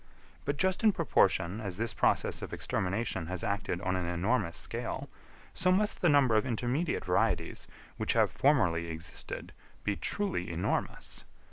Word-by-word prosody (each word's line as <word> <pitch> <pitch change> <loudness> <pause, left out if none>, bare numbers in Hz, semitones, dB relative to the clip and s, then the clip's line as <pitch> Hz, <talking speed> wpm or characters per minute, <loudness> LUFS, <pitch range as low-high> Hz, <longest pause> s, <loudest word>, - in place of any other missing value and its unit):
But 145 0 -1
just 190 +6 +1
in 215 -2 +6
proportion 100 - +2
as 95 -4 -4
this 115 +2 -1
process - - +1
of - - -6
extermination 95 -3 -2
has 90 -1 -3
acted 100 -3 -1
on 90 - 0
an 90 -2 -1
enormous 85 -1 0
scale, - - -4 0.4
so 185 +1 +2
must 210 +3 +2
the 175 - +4
number 140 -5 +5
of 110 - +4
intermediate 130 +6 -1
varieties, - - 0 0.3
which - - 0
have - - +3
formerly 85 - +2
existed, 80 +1 -6 0.3
be 105 - 0
truly 195 - -1
enormous. 85 +2 -2
110 Hz, 150 wpm, -31 LUFS, 90-145 Hz, 0.4 s, in